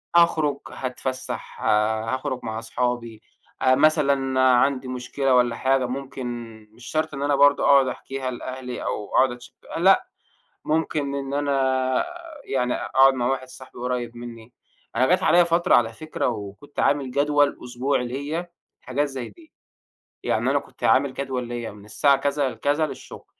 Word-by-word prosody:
أخرج، 160 -4 +4
هاتفسّح 130 0 -5
آآ، 110 +1 +2
هاخرج 130 -1 -3
مع 110 0 -4
صحابي 120 -2 -3 0.4
آآ، 130 0 +5
مثلًا 140 -3 +2
عندي 130 +1 +3
مشكلة 125 +1 0
والّا 120 -1 +3
حاجة، 130 0 +1
ممكن 135 0 -5 0.5
مش 120 +2 -15
شرط 155 -1 -1
إن 140 - -5
أنا 145 0 +2
برضه 145 0 +5
أقعد 140 -2 +6
أحكيها 130 0 -4
لأهلي 125 0 -6
أو 105 - -3
أقعد 130 -1 +5
أتش 120 0 -11 0.2
لأ، 195 - +4 0.6
ممكن 150 -2 -1
إن 140 0 -3
أنا 130 -2 +1 0.4
يعني 125 -2 0
أقعد 135 0 +4
مع 120 -2 -1
واحد 130 0 -1
صاحبي 130 0 -12
قُريّب 120 -1 -3
منّي، 120 -1 -10 0.4
أنا 130 +2 +4
جات 180 - +3
عليَّ 175 0 +5
فترة 170 +2 +2
على 115 -1 +3
فكرة 155 +4 -3
وكنت 105 +5 -6
عامل 140 -3 +1
جدول 145 +1 +2
أسبوعي 125 +1 -1
ليَّ، 145 +7 -4 0.3
حاجات 145 +3 -1
زي 130 -3 -6
دي، 330 -2 -19 0.7
يعني - - 0
أنا - - +3
كنت - - -12
عامل 135 0 +3
جدول 130 -3 -3
ليَّ 120 -2 -4
من 105 0 -14
الساعة 140 +6 +3
كذا 140 0 0
لكذا 145 +5 0
للشغل، - - -10
130 Hz, 155 wpm, -24 LUFS, 125-145 Hz, 0.7 s, أقعد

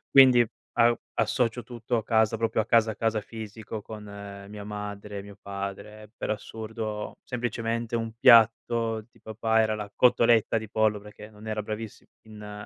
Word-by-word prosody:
quindi, 125 -3 +8 0.3
a 120 0 +5 0.2
associo 115 +2 +1
tutto 120 0 -3
a 110 - -2
casa, 110 -1 +3
proprio 115 -1 +1
a - - -5
casa, 115 -1 +4
a - - -8
casa 110 -1 0
fisico, 110 0 -7
con 105 0 -9 0.4
mia 105 0 -8
madre, 105 -1 -6
mio 100 0 -12
padre. 100 +2 -7
Per - - -5
assurdo, 110 0 -5
semplicemente, 115 -1 -2
un 115 -1 -4
piatto 115 -1 +5
di - - -24
papà 110 +1 0
era 110 -1 +2
la 105 -1 -6
cotoletta 115 -2 +4
di 110 -2 -5
pollo 105 -2 +1
perché 105 0 -12
non 105 +1 -13
era 110 -1 -2
bravissimo 110 +1 -7 0.2
in 105 -1 -9
110 Hz, 160 wpm, -27 LUFS, 105-115 Hz, 0.4 s, quindi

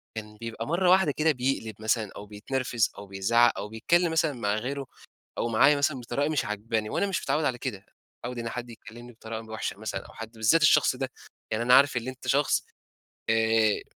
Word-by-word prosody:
كان 105 -1 -7
بيبقى 115 0 -6
مرّة 175 +3 +2
واحدة 185 -4 +5
كده 155 +1 +3
بيقلب 125 -5 -2
مثلًا 110 -1 0
أو 105 - -8
بيتنرفز 115 +3 -1
أو 100 - -8
بيزعق 110 +5 +3
أو 105 - -5
بيتكلّم 170 +11 +1
مثلًا 160 -2 +1
مع 105 -4 -1
غيره 135 +5 -3 0.5
أو - - 0
معايا 135 +6 +5
مثلًا 140 -2 0
بطريقة 140 +5 -2
مش 155 -4 0
عاجباني، 110 +1 -2
وأنا 200 - 0
مش 195 - -2
متعوّد 155 0 0
على 125 - 0
كده، 120 -4 -4
مش 95 - -31
متعوّد 120 0 -5
إن 115 0 -3
حد 120 0 -6
يكلمني 120 +1 -12
بطريقة 110 0 -7
وحشة 110 -2 -4
مثلًا 110 - -5
أو - - -14
حد 110 0 -8
بالذات 110 +8 +3
الشخص 155 - +5
ده. 130 0 -4 0.4
يعني 110 +2 0
أنا 125 +1 +4
عارف 140 -1 +5
إن 120 +1 -3
أنت 130 0 -8
شخص 140 +1 +2 0.7
آآ، 110 -1 +3
120 Hz, 200 wpm, -27 LUFS, 110-140 Hz, 0.7 s, واحدة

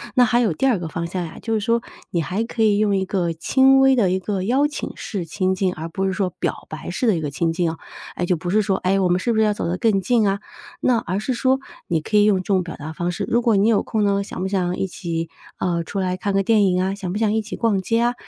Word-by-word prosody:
那 250 - +6
还 240 +1 +2
有 215 -8 +2
第 210 - -1
二 245 -5 +3
个 175 -2 -5
方 170 +2 -4
向 180 0 -3
呀， 160 - -9
就 225 - -2
是 220 - +2
说， 230 +2 +1 0.3
你 170 - 0
还 190 +7 -2
可 230 0 -4
以 210 -2 +4
用 205 -1 +2
一 190 - 0
个 180 -4 -1
轻 265 +10 +4
微 270 0 +5
的 195 -7 +2
一 190 - +1
个 190 -1 -3
邀 260 +8 +2
请 295 - -5
式 195 -6 -5
亲 185 +3 -1
近， 185 -1 0
而 160 +1 -6
不 190 +3 -2
是 190 - 0
说 185 -1 0
表 - - -3
白 155 - -7
式 235 +7 -1
的 210 - +4
一 160 - -2
个 145 -2 -3
亲 165 +2 0
近 170 -1 0
啊。 165 - -8 0.4
哎， 175 - -1
就 180 0 +1
不 175 +2 -5
是 215 +3 +3
说： 195 -1 0
“哎， 195 +2 +2
我 185 -2 +2
们 180 +1 +2
是 235 - 0
不 220 - +1
是 - - +5
要 210 - +2
走 205 - -3
得 175 +2 -1
更 210 -3 +2
近 220 +2 +2
啊？” 195 0 0 0.4
那 245 -2 +3
而 190 -1 -2
是 250 +4 -2
说， 260 +2 +2 0.3
你 165 -2 0
可 210 +7 0
以 205 - +6
用 205 -3 +4
这 185 - -3
种 190 -1 +1
表 170 - -7
达 155 +1 -7
方 175 +2 -2
式： - - -3
“如 235 - +2
果 230 -2 +3
你 200 +2 +3
有 225 -3 +3
空 220 -2 -1
呢， 200 -1 +2
想 195 - -8
不 190 - -1
想 180 -2 -1
一 - - 0
起， 165 -3 -4 0.3
呃， 170 -2 -1
出 195 +4 -4
来 185 -1 -1
看 200 +1 -2
个 195 - +2
电 215 0 +4
影 185 -1 +2
啊， 190 +1 0
想 195 -3 -5
不 205 - -2
想 215 -1 +1
一 220 - +1
起 215 +1 -7
逛 210 -5 +1
街 230 +4 +1
啊？” 240 +1 +2
195 Hz, 330 characters per minute, -21 LUFS, 180-220 Hz, 0.4 s, 那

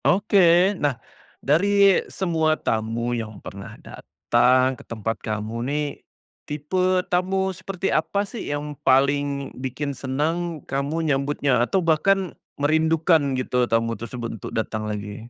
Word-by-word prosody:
Oke 190 -1 +4
nah 145 -4 +1 0.5
dari 200 +6 +4
semua 160 -4 0
tamu 115 +2 -1
yang 110 -3 -4
pernah 100 0 -10
datang 130 +2 +1
ke 125 - -12
tempat 115 0 -4
kamu 110 +1 -4
nih, 150 +1 0 0.6
tipe 180 +5 0
tamu 190 +1 0
seperti 185 +1 -3
apa 200 +6 0
sih 220 +2 -7
yang 145 0 -3
paling 140 +1 +2
bikin 135 +2 -3
senang 155 +5 -2
kamu 145 +4 -1
nyambutnya, 140 -3 +1
atau 190 +8 0
bahkan 185 +3 +2 0.2
merindukan 155 -1 +2
gitu 125 -1 +1
tamu 115 0 +1
tersebut 115 0 -6
untuk - - -6
datang 110 -1 -2
lagi? 105 +2 -6
145 Hz, 125 wpm, -23 LUFS, 120-175 Hz, 0.6 s, Oke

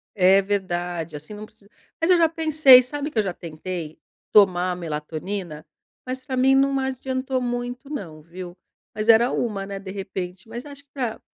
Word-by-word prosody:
É 190 0 +5
verdade, 175 -4 -3
assim 150 +8 -9
não 210 +1 -8
precisa 215 -1 -23 0.3
mas 330 - +1
eu 360 - +6
já 335 -1 +5
pensei, 310 -5 +6
sabe? 290 +4 -4
Que 225 - 0
eu 215 - +3
já 190 - -2
tentei 165 -1 -7 0.3
tomar 185 -3 +4
melatonina, 160 +1 -5 0.4
mas 255 0 -4
pra 260 - -3
mim 265 +1 +4
não 275 0 +3
adiantou 260 0 -2
muito 245 +2 -4
não, 165 - -6
viu? 175 +2 -10 0.4
Mas 215 +1 -4
era 230 +2 +6
uma, 200 -4 -2
né, 200 0 -5
de 195 -1 -8
repente. 190 0 -6
Mas 240 +3 -7
acho 285 -1 -12
que 285 - -47
pra 245 -5 -3
205 Hz, 180 wpm, -23 LUFS, 180-260 Hz, 0.4 s, eu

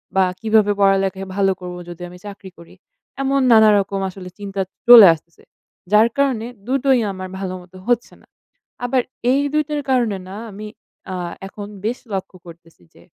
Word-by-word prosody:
বা 190 - +4 0.2
কিভাবে 215 -2 +3
পড়ালেখা 195 -1 +2 0.2
ভালো 195 -1 +2
করব 180 0 -7
যদি 175 0 -10
আমি 180 - -12
চাকরি 200 -2 -9
করি? 170 +1 -16 0.5
এমন 275 0 +1
নানারকম 205 -3 +4
আসলে 180 -1 -10
চিন্তা 195 -1 -4 0.3
চলে 230 -5 +11
আসতেছে। 170 +1 -15 0.5
যার 215 +2 +6
কারণে 260 -5 +1 0.2
দুটোই 270 -1 +2
আমার 185 -1 -7
ভালোমতো 185 -1 -7
হচ্ছে 240 -1 0
না। - - -25 0.6
আবার 255 0 +1 0.3
এই 275 +2 +2
২ 305 0 +2
টার 295 -1 -2
কারণে 235 -6 +1
না 195 - -8 0.2
আমি 210 +2 -8 0.5
আ - - -3 0.3
এখন 205 +1 -9 0.2
বেশ 240 +3 -2
লক্ষ্য 190 -1 -5
করতেছি 165 - -16
যে, - - -19
200 Hz, 160 wpm, -20 LUFS, 185-235 Hz, 0.6 s, চলে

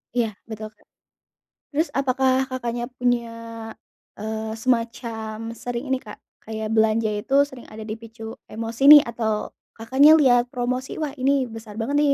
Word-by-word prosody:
Iya, 235 -3 +2 0.2
betul, 215 0 -6
Kak. - - -29 0.9
Terus 315 +3 +2
apakah 265 -1 +1
Kakaknya 240 -2 -3
punya, 245 -2 +1 0.9
eee, 220 +1 -4
semacam 225 -2 -2
sering 245 +3 -5
ini 265 - +2
Kak, 210 -3 -10 0.3
kayak 220 0 -4
belanja 220 0 +3
itu 210 +6 -2
sering 265 -4 -10
ada 220 0 -9
dipicu 225 +1 -8
emosi 225 +3 -6
nih, 295 0 +12
atau 220 -2 -2 0.2
Kakaknya 265 +7 +6
liat 250 -6 +5
promosi, 255 +1 -2
"Wah, 300 -3 -1
ini 265 -1 +2
besar 225 -2 -10
banget 230 +6 -2
nih," 290 -1 +4
235 Hz, 145 wpm, -23 LUFS, 220-260 Hz, 0.9 s, nih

